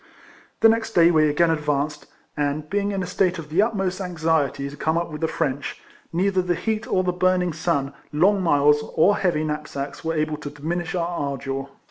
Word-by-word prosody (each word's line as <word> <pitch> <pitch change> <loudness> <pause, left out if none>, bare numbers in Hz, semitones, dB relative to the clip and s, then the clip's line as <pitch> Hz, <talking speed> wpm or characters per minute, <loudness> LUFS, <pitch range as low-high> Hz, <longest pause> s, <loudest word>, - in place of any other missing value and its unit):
The 225 - +8
next 225 0 0
day 170 0 +6
we 155 -2 +4
again 165 +3 +3
advanced, 150 -1 -1 0.3
and 150 +1 -1
being 200 +3 -1
in 195 -2 -2
a - - -3
state 180 0 +1
of 155 -2 -8
the 170 +6 +3
utmost 195 -4 -1
anxiety 160 -6 0
to 140 - -8
come 160 +2 0
up 170 -1 -2
with 150 - -7
the 160 - +2
French, 140 -4 -2 0.3
neither 185 +2 +1
the 180 -1 0
heat 220 +4 -2
of 185 0 +1
the 180 - +1
burning 180 -1 +1
sun, 145 -4 -1 0.2
long 190 +7 +3
miles, 150 -3 +4
or 205 +6 +4
heavy 170 -5 +1
knapsacks 150 -2 -4
were 165 0 -1
able 155 0 -1
to 150 -1 -7
diminish 165 +4 -4
our 170 -1 0
ardour. 140 -4 -3
165 Hz, 195 wpm, -23 LUFS, 150-185 Hz, 0.3 s, The